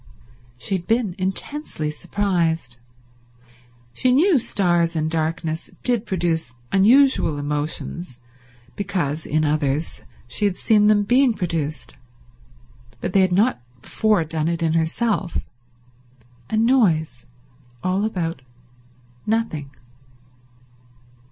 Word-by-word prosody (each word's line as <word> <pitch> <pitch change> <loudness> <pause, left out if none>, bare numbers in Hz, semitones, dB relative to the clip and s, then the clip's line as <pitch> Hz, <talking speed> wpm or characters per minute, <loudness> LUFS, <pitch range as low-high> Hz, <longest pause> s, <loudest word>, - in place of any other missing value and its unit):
She 190 +10 -1
had 175 - -11
been 225 -5 +1
intensely 190 - -2
surprised. 165 -7 -1 1.2
She 255 - +2
knew 310 +4 +4
stars 175 -6 +1
and 155 0 -1
darkness 160 0 -2
did 240 -3 +1
produce 165 - -1 0.2
unusual 225 - +4
emotions 150 0 -4 0.6
because, 175 -7 -2
in 155 +1 +1
others, 150 0 -1 0.3
she 205 - -1
had 195 -3 0
seen 210 -2 +4
them 210 -1 +4
being 245 +2 +3
produced, 165 -5 -3 1.0
but 180 - -4
they 195 - +5
had 185 -1 +2
not 205 - +2 0.2
before 215 -6 +1
done 160 0 -2
it 170 0 -1
in 160 -1 +1
herself. 170 +4 0 1.1
A 220 - 0
noise 185 - +2 0.6
all 185 +2 0
about 170 -9 -2 0.9
nothing. 210 -11 -1
175 Hz, 105 wpm, -22 LUFS, 155-210 Hz, 1.2 s, they